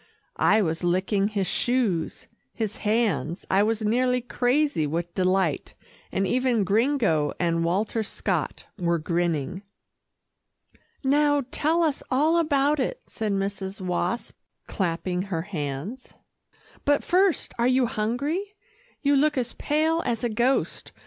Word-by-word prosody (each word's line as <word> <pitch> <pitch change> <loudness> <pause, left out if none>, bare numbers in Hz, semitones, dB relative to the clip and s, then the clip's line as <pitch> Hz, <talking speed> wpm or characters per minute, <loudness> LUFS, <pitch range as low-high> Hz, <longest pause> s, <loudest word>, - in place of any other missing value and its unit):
I 215 - +4
was 165 0 -2
licking 190 +3 +1
his 205 -2 -1
shoes, 225 -8 0 0.3
his 220 -2 -3
hands 210 -6 0
I 195 - +4
was 220 +1 0
nearly 250 +3 +2
crazy 245 - +1
with 170 +3 -3
delight, 185 -4 0 0.4
and 195 - 0
even 245 0 +1
Gringo 205 - +2
and 165 -1 +1
Walter 205 +6 0
Scott 215 - -3
were 170 -1 +1
grinning. 170 +1 -1 1.4
"Now, 290 +1 +3
tell 330 +3 +1
us 305 -4 0
all 305 +6 +3
about 295 -2 +2
it," - - -1
said 220 -2 -3
Mrs. 195 0 -3
Wasp, 180 +4 -2 0.3
clapping 180 0 -2
her 185 -4 -3
hands, 170 - -5 0.7
"but 290 0 +2
first, 375 -1 +2
are 235 - +3
you 255 0 +3
hungry? 280 - -2 0.5
You 285 0 +4
look 295 +1 +2
as 245 -2 -1
pale 315 +3 +1
as 235 0 -2
a 240 - +1
ghost. 240 +5 0
215 Hz, 130 wpm, -25 LUFS, 180-270 Hz, 1.4 s, I